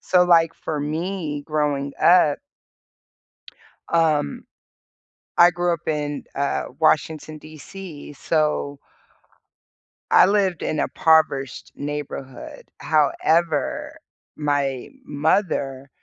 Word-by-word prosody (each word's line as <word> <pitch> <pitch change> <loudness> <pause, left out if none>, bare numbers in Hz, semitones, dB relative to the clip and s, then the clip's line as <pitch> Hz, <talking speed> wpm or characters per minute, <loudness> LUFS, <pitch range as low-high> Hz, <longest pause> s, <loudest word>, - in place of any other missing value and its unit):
So, 180 -1 +3
like, 165 -2 +4
for 155 -2 -4
me 155 0 -3
growing 145 -3 -1
up 170 -4 +5 1.5
um, 155 - +1 0.9
I 175 0 +7
grew 175 0 0
up 165 - -5
in, 150 -2 -2
uh, 140 0 -1
Washington, 155 0 0
D.C., 155 +1 -10
so 150 -1 -1 1.3
I - - +7
lived 195 -4 +1
in 155 - -2
a - - -1
poverished 155 -6 +1
neighborhood, 145 -2 -7 0.2
however, 155 0 +1 0.4
my 145 -3 -1 0.2
mother, 145 -3 -1
155 Hz, 90 wpm, -22 LUFS, 145-170 Hz, 1.5 s, I